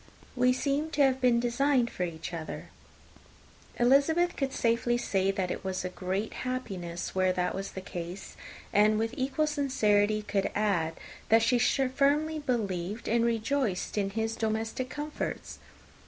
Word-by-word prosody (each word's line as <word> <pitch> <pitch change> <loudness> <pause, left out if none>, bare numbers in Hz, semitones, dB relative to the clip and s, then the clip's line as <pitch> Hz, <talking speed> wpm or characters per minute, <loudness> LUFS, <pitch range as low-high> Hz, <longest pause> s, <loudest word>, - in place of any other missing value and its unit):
We 250 0 +4
seem 280 +4 0
to 290 - +6
have 265 -1 +2
been 245 -2 +4
designed 245 +1 +2
for - - -7
each 170 -1 -4
other." 160 -2 -6 1.1
Elizabeth 285 +8 +4
could 270 -1 -1
safely 235 0 +1
say 195 -5 0
that 190 -2 -1
it - - -4
was 190 -1 -3
a - - -1
great 190 +4 -3
happiness 190 -10 -4
where 185 0 +2
that 180 0 0
was 195 +1 -5
the 190 - -5
case, 175 +1 -7 0.4
and 210 +1 +5
with 225 +2 -1
equal 270 +4 0
sincerity 215 -8 +2
could 205 -1 0
add, 190 -6 +1 0.4
that 225 +1 +6
she 240 +1 +3
firmly 280 +5 +2
believed 210 - -2
and 230 +1 +2
rejoiced 235 -3 0
in 200 -2 0
his 225 +2 -2
domestic 225 +3 -2
comforts. 295 +2 -5
225 Hz, 150 wpm, -29 LUFS, 195-265 Hz, 1.1 s, to